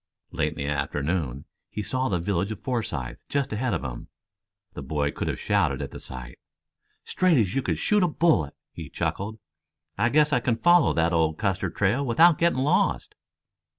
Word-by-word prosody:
Late 75 -3 -1
in - - -20
the 70 - -4
afternoon, 70 0 -2 0.2
he 105 - -4
saw 130 +4 -1
the 95 - +1
village 95 +3 -1
of 110 - -7
Forsythe 105 - -3
just 140 -1 -1
ahead 120 +3 -1
of - - -4
him. - - -6 0.7
The - - -7
boy 70 +1 -1
could - - -4
have - - -2
shouted - - +1
at - - -5
the - - -8
sight. 60 -1 -8 0.6
"Straight 185 -4 +2
as 100 -6 +1
you 135 - +1
could - - -1
shoot 210 -1 +2
a 180 - +4
bullet," 150 - +1 0.2
he 80 -4 -8
chuckled. 105 +9 -3 0.6
"I 120 +3 +3
guess 150 +2 +3
I 125 - +4
can 120 -1 0
follow 175 +4 +5
the 85 0 +1
old 80 -2 +1
Custer 100 -3 -1
trail 105 +8 +1
without 150 +6 +4
getting 170 -4 +2
lost." 150 +7 +1
100 Hz, 185 wpm, -25 LUFS, -, 0.7 s, follow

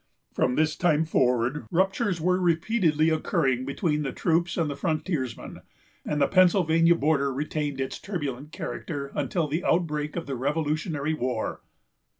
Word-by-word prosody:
From 125 - +1
this 155 0 +1
time 160 -2 +2
forward, 125 -3 +1
ruptures 190 - +1
were 180 +3 +2
repeatedly 165 -2 +2
occurring 135 -5 0
between 150 +2 -1
the 135 -3 -2
troops 170 +4 0
and 165 -3 +1
the 145 - -3
frontiersmen; 155 -4 -3 0.4
and 150 - -2
the 140 - +4
Pennsylvania 170 -3 +4
border 140 -3 +1
retained 145 0 -3
its 135 - -3
turbulent 145 -7 -5
character 140 -3 -5
until 155 +3 -1
the 155 +5 -2
outbreak 150 -3 0
of 170 - -3
the 135 - -4
Revolutionary 150 +2 -1
War. 125 -6 -3
155 Hz, 145 wpm, -26 LUFS, 140-170 Hz, 0.4 s, the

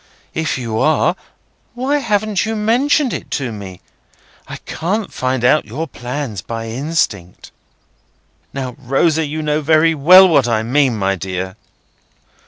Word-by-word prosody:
If 160 -3 -1
you 115 -3 -3
are, 155 - +2 0.6
why 270 +4 0
haven't 215 -5 0
you 225 0 -2
mentioned 245 +6 +1
it - - -6
to 130 -5 -4
me? 100 -4 -9 0.7
I - - -7
can't 200 +6 -3
find 130 -1 -1
out 150 +5 +3
your 140 +9 -4
plans 125 - -5
by 115 +2 -6
instinct." 120 - -3 1.0
"Now, 130 -3 -5
Rosa, 150 +5 +1
you 155 +2 -4
know 150 0 0
very 160 +2 +3
well 180 +6 +7
what 140 -8 +3
I 110 -2 0
mean, 130 0 +1
my 100 -1 0
dear." 95 0 -5
145 Hz, 140 wpm, -17 LUFS, 115-170 Hz, 1.0 s, well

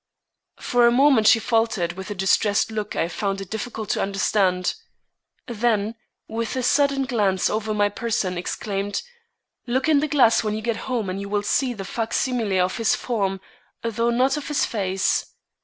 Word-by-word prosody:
For 245 -1 +3
a - - +5
moment 260 -3 +4
she 225 - +7
faltered, 225 -6 0
with 190 +2 -8
a 205 - -4
distressed 200 +3 +2
look 215 -1 -4
I 165 - 0
found 195 +3 -2
it 195 -2 -8
difficult 220 -1 -4
to - - 0
understand. 195 -2 +1 0.7
Then, 225 -3 0 0.3
with 230 +2 -3
a 255 - -1
sudden 280 +1 +2
glance 205 -7 +1
over 215 0 -2
my 205 -1 +2
person, 205 -3 -2
exclaimed: 200 +3 -3 0.6
"Look 255 +3 0
in 305 -3 +4
the 305 - 0
glass 250 -7 +4
when 215 -1 -1
you 215 - -4
get 230 -1 -1
home 235 -5 -1
and 185 +2 -3
you 200 - -6
will 205 0 0
see 250 +3 0
the 195 -2 -6
fac 225 +3 -3
simile 225 -8 +1
of 185 - -4
his 225 -1 +2
form, 195 -6 -2 0.4
though 230 +1 0
not 260 +4 +2
of 295 - -6
his 295 - +1
face. 190 -3 0
220 Hz, 180 wpm, -23 LUFS, 195-240 Hz, 0.7 s, she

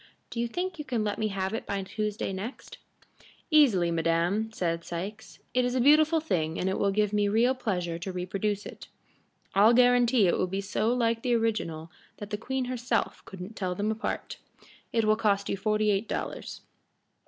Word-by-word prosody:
Do 235 - -4
you 235 - +1
think 355 +5 -4
you - - -3
can 240 -5 -1
let 205 -1 -2
me 220 - +1
have 195 -1 -2
it 225 - -4
by 200 - -1
Tuesday 210 0 -3
next?" 205 +7 -7 0.7
"Easily, 220 - +5
madam," 170 +6 +1
said 170 -5 -2
Sikes. 195 +6 -6 0.2
"It 250 - +3
is 245 +1 0
a - - +2
beautiful 310 +5 +5
thing 165 - -1
and 185 - 0
it 190 - -1
will 200 - +2
give 210 +1 +1
me 205 -1 +2
real 230 +5 +3
pleasure 180 -9 -2
to 190 +3 -4
reproduce 195 +3 -2
it. - - -10 0.7
I'll 210 +4 +6
guarantee 245 -2 +5
it 175 - +2
will 185 - +1
be 195 +2 -3
so 205 +3 0
like 230 -2 +1
the 245 -1 +1
original 170 -8 -1 0.3
that 205 0 -8
the 210 - -1
queen 260 +4 -2
herself 250 -1 -2
couldn't 190 +3 -9
tell 185 -4 -2
'em 210 +2 0
apart. 220 +2 -4 0.5
It 225 -2 +1
will 215 0 +4
cost 200 -3 +1
you - - 0
forty 215 +1 +1
eight 200 +2 0
dollars. - - -5
210 Hz, 190 wpm, -28 LUFS, 190-235 Hz, 0.7 s, I'll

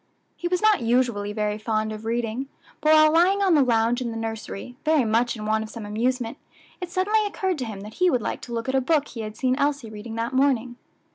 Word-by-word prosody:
He 345 - -3
was 360 +2 -1
not 430 -8 +4
usually 230 -4 +1
very 210 0 -2
fond 215 0 -1
of 215 +1 -8
reading, 235 +3 -2 0.3
but 305 +1 +3
while 310 0 +6
lying 375 +4 +4
on 380 -3 +4
the 300 - +5
lounge 235 -1 +2
in 240 - -2
the 225 - -5
nursery, 225 +1 -6
very 310 -5 +3
much 230 +3 +1
in 215 -1 -6
want 220 0 +1
of 220 - -8
some 225 -1 -8
amusement, 235 +4 -2 0.4
it 360 - -4
suddenly 415 +5 +1
occurred 380 -4 -2
to 255 - -2
him 210 -3 -7
that 210 +2 -9
he 365 - +6
would 255 - +2
like - - -4
to 240 - -9
look 230 +1 -3
at 260 - -1
a 265 - +3
book 295 +2 +1
he 230 - -7
had 215 0 -7
seen 255 -1 +1
Elsie 280 -6 -1
reading 215 +1 -8
that 230 +3 -2
morning. 255 -3 +1
240 Hz, 240 wpm, -24 LUFS, 220-295 Hz, 0.4 s, while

